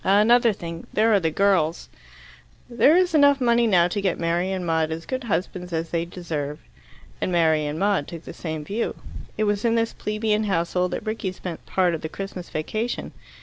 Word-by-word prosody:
"Another 225 +4 +5
thing 170 -4 -7
there 220 +1 +3
are 200 - +5
the 165 -3 0
girls." 175 -2 +1 0.8
"There 245 +7 +4
is 360 -2 +2
enough 285 -2 +5
money 235 -2 +3
now 175 -5 +4
to 200 +3 -2
get 190 -3 0
Mary 175 +3 0
and 185 -2 -3
Maud 160 -1 +1
as 165 +1 -5
good 260 -1 -4
husbands 180 -2 -2
as 165 0 -3
they 170 0 0
deserve." 155 -5 -5 0.6
And - - -1
Mary 160 -3 +2
and 150 +1 -3
Maud 195 -5 +1
took 165 -1 -8
the - - -9
same 160 -2 -5
view. 215 +7 -2 0.4
It 215 - +1
was 205 -1 0
in 230 -1 +2
this 230 0 0
plebeian 215 0 -1
household 180 -1 0
that - - -4
Rickie 215 -3 -3
spent 175 -2 -7
part 180 -2 +2
of 160 - -3
the 160 - -4
Christmas 190 -1 -7
vacation. 215 +10 -3
185 Hz, 195 wpm, -24 LUFS, 165-215 Hz, 0.8 s, Another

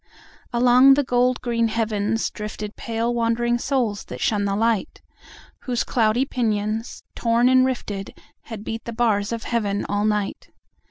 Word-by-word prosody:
Along 250 +2 +6
the 290 - +2
gold 250 0 +1
green 235 -2 0
heavens 220 -1 -1
driftedPale 220 +2 -4
wandering 240 +1 +1
souls 240 -7 -1
that - - -8
shun 205 -2 +1
the 195 0 0
light, 225 - 0 0.7
Whose 245 -2 0
cloudy 230 +2 +1
pinions, 220 -2 -2
torn 235 +1 +2
and 255 0 +5
rifted, 205 -6 -5 0.3
Had 220 -3 -8
beat 225 +1 -5
the 235 - -5
bars 220 -3 +1
of 230 -1 -4
Heaven 205 -4 -1
all 205 +1 0
night. 210 -2 -2
230 Hz, 145 wpm, -23 LUFS, 210-245 Hz, 0.7 s, Along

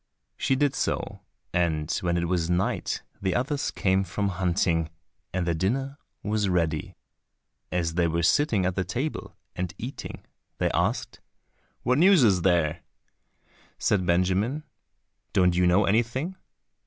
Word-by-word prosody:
She 135 - +1
did 140 0 +2
so, - - -2 0.3
and 80 -3 0
when 85 -1 0
it 85 - 0
was 85 -1 0
night 90 +1 -1 0.2
the 95 -2 0
others 140 +3 0
came 95 0 +1
from 100 +2 -2
hunting, 85 -3 +1 0.4
and 90 -1 -1
their 85 - +1
dinner 135 - -1 0.2
was 105 -1 0
ready. 80 -4 0 0.8
And 90 - +1
as 80 -1 -2
they 85 0 +2
were 85 +1 0
sitting 110 - +3
at 90 - +1
table, 130 +9 -4 0.2
and 90 -1 -3
eating, 125 +5 -7 0.3
they - - +1
asked, - - -1 0.6
"What 125 +3 +2
news 185 -3 +6
is 95 -6 +4
there?" 85 -2 +2 1.0
Said 95 -3 +1
Benjamin, 95 - +1 0.7
"Don't 90 -3 +4
you 90 0 +3
know 95 +4 +4
anything?" 120 - 0
95 Hz, 140 wpm, -26 LUFS, 85-120 Hz, 1.0 s, news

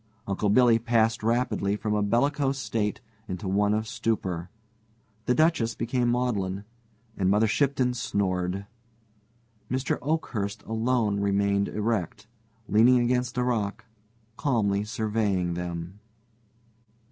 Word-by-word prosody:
Uncle 100 +1 -1
Billy 115 +1 +5
passed 115 -1 +2
rapidly 115 -3 0
from 105 0 -2
a 105 - +1
bellicose 135 +6 +1
state 110 -5 -2 0.3
into 95 0 -5
one 100 +2 +2
of 110 +1 0
stupor, 95 -7 -2 0.8
the 125 - +3
Duchess 155 -8 +2
became 120 +1 0
maudlin, 100 -6 -1 0.5
and 95 -2 +1
Mother 105 +3 +4
Shipton 130 +2 +1
snored. 95 -4 -1 1.0
Mr. 130 +2 -1
Oakhurst 120 -10 -2
alone 115 -2 0
remained 100 0 +1
erect, 105 -5 -2 0.4
leaning 120 +4 +5
against 125 0 0
a 125 - +2
rock, 110 -4 -1 0.5
calmly 105 -7 +1
surveying 105 -5 -1
them. 85 +2 -5
110 Hz, 110 wpm, -27 LUFS, 100-125 Hz, 1.0 s, Billy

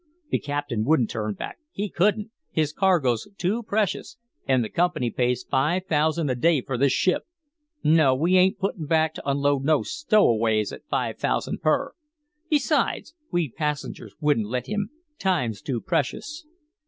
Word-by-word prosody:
The - - +2
captain 145 -6 -2
wouldn't 130 -3 +2
turn 105 -2 -3
back - - -7
he 205 - -3
couldn't 210 +3 +1 0.2
his 155 -1 0
cargo's 155 - +2
too 205 +6 0
precious 215 -3 -2 0.3
and 130 -2 +3
the 110 - -4
company 170 -9 +1
pays 125 0 0
five 155 +7 0
thousand 160 -1 +1
a - - +2
day 150 +3 +2
for 130 +1 -4
this 135 +2 +3
ship. 180 +7 +1 0.6
No, 155 -4 +5
we 170 +7 +2
ain't 185 +1 +4
puttin' 190 -5 -3
back 160 0 +2
to - - -5
unload 140 0 +1
no 155 0 +3
stowaways 115 - +2
at - - -11
five - - -1
thousand - - -1
per. 155 - +1 0.6
Besides, 300 -3 +1 0.2
we 170 -7 0
passengers 150 0 -4
wouldn't 145 -9 +1
let 125 +3 -2
him 210 -1 -2 0.3
time's 130 - 0
too 130 -4 -2
precious." 300 - -2
150 Hz, 155 wpm, -25 LUFS, 125-185 Hz, 0.6 s, No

